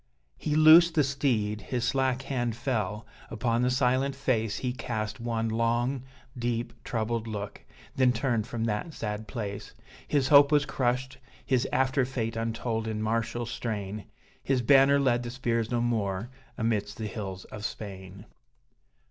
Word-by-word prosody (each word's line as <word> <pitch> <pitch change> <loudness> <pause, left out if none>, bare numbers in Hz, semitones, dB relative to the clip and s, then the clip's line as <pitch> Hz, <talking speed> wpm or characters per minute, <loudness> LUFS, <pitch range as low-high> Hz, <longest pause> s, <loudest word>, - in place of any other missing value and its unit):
He 150 - -1
loosed 160 +2 +8
the 150 - +4
steed; 120 -7 0
his 120 +3 -3
slack 130 +1 +1
hand 120 -4 -2
fell 110 -4 -2 0.2
upon 115 +1 0
the 125 - +2
silent 130 +1 +1
face 115 -6 0
He 125 -1 -2
cast 110 -3 -4
one 115 -1 -1
long, 120 +3 0 0.3
deep, 120 -1 -2
troubled 115 0 -2
look 105 -2 -6 0.3
then 130 -1 +4
turned 120 -2 0
from 115 -1 -3
that 115 +9 -2
sad 105 0 -4
place: 100 -1 -6 0.3
His 140 -2 +1
hope 140 0 +7
was 145 -1 +4
crushed, 130 0 -1 0.3
his 130 -2 +1
after 130 +1 +2
fate 115 -3 -3
untold 115 0 -2
in 110 -1 -2
martial 115 +2 -1
strain, 105 -3 -4 0.4
His 130 -3 0
banner 140 +2 +6
led 125 -3 +2
the 120 - -5
spears 115 -3 -1
no 120 -1 0
more 110 -1 -1 0.3
amidst 110 -3 -1
the 110 - -4
hills 95 -2 -5
of 105 - -9
Spain. 100 -2 -7
120 Hz, 150 wpm, -28 LUFS, 110-130 Hz, 0.4 s, loosed